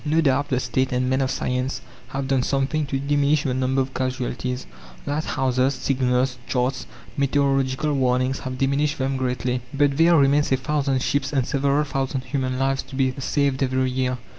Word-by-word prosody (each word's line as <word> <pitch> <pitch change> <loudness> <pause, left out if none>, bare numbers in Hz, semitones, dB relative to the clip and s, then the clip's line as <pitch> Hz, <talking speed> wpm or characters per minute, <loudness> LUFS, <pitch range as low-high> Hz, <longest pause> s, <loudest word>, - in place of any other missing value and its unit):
No 155 +2 +1
doubt 145 -2 +2
the 130 -4 0
State 130 0 0
and 125 0 0
men 130 +1 +1
of 130 - 0
science 125 +1 -2 0.3
have 135 -1 -4
done 135 -1 +2
something 140 +3 0
to 135 - -1
diminish 145 +1 +2
the 130 - -1
number 130 +1 +1
of 130 0 -4
casualties. 125 0 -3 0.4
Lighthouses, 135 -3 0
signals, 125 -1 0
charts, 130 +1 -1 0.3
meteorological 140 +1 +1
warnings 130 -1 +1
have 130 -1 -5
diminished 140 +3 +1
them 135 0 -1
greatly, 125 -1 -1
but 140 -1 +1
there 165 +1 +5
remains 145 +1 +3
a 130 - +4
thousand 140 -1 0
ships 140 0 0
and 135 -4 +1
several 140 +2 +1
thousand 135 -2 -2
human 130 -1 -2
lives 135 0 +1
to - - -11
be 130 -1 +1
saved 140 0 0
every 130 -1 +1
year. 125 -1 -1
135 Hz, 175 wpm, -23 LUFS, 130-140 Hz, 0.4 s, there